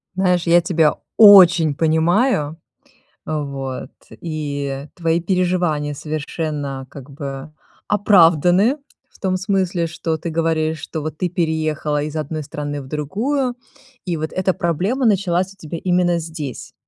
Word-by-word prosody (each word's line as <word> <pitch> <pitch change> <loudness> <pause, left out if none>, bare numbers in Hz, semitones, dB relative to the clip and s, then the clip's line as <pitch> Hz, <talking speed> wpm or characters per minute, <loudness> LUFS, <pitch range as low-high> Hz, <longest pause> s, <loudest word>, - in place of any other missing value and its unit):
Знаешь, 180 -2 +1
я 170 +1 +6
тебя 165 -3 +2 0.2
очень 180 -8 +8
понимаю. 160 - +1 0.7
Вот. 140 -3 -4 0.2
И 145 -4 -4
твои 165 -1 0
переживания 175 -5 0
совершенно 150 -2 -4
как 140 0 -11
бы 140 +1 -7 0.4
оправданы 195 - +4 0.3
в - - -22
том 185 -1 0
смысле, 185 -2 0
что 165 -1 -3
ты 165 +2 -5
говоришь, 160 -1 0
что 160 - -5
вот 155 0 -5
ты 180 - 0
переехала 155 -3 -1
из 150 +1 -5
одной 155 0 -3
страны 145 0 -5
в 130 - -12
другую. 235 - -1 0.5
И 175 -3 -2
вот 155 0 -4
эта 185 0 +1
проблема 190 - -1
началась 190 -2 +1
у - - -32
тебя 165 -1 -7
именно 175 -1 +2
здесь, 145 -7 -7
165 Hz, 130 wpm, -20 LUFS, 150-180 Hz, 0.7 s, очень